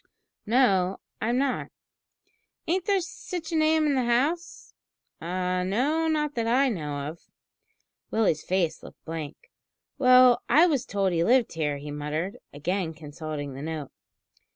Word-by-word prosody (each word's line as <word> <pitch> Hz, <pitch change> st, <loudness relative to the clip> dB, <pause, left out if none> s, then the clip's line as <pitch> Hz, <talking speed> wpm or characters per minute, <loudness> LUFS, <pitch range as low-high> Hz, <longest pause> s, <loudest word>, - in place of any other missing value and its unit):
"No, 195 Hz, -6 st, +3 dB, 0.2 s
I'm 235 Hz, +3 st, +1 dB
not." 270 Hz, -1 st, 0 dB, 1.0 s
"Ain't 360 Hz, +2 st, 0 dB
there 400 Hz, -2 st, +3 dB
sitch 345 Hz, 0 st, -6 dB
a -, -, -1 dB
name 315 Hz, 0 st, +3 dB
in 295 Hz, -, +2 dB
the 260 Hz, -2 st, +1 dB
house?" 285 Hz, +9 st, -1 dB, 0.5 s
"No, 185 Hz, -, 0 dB
not 300 Hz, -2 st, 0 dB
that 230 Hz, -3 st, -1 dB
I 260 Hz, +4 st, +3 dB
know 145 Hz, -, -4 dB
of." 160 Hz, +3 st, -7 dB, 0.9 s
Willie's 200 Hz, -9 st, +1 dB
face 175 Hz, -4 st, 0 dB
looked -, -, -14 dB
blank. 160 Hz, -2 st, -7 dB, 0.5 s
"Well, 255 Hz, -1 st, +6 dB
I 320 Hz, +4 st, +6 dB
was 280 Hz, -8 st, +1 dB
told 195 Hz, -2 st, 0 dB
he 165 Hz, 0 st, +2 dB
lived 245 Hz, +3 st, +3 dB
here," 150 Hz, -3 st, -1 dB
he 145 Hz, +1 st, -7 dB
muttered, 150 Hz, +6 st, -4 dB
again 165 Hz, +3 st, -2 dB
consulting 150 Hz, -2 st, -6 dB
the 135 Hz, -, -8 dB
note. 155 Hz, -2 st, -5 dB
200 Hz, 140 wpm, -26 LUFS, -, 1.0 s, Well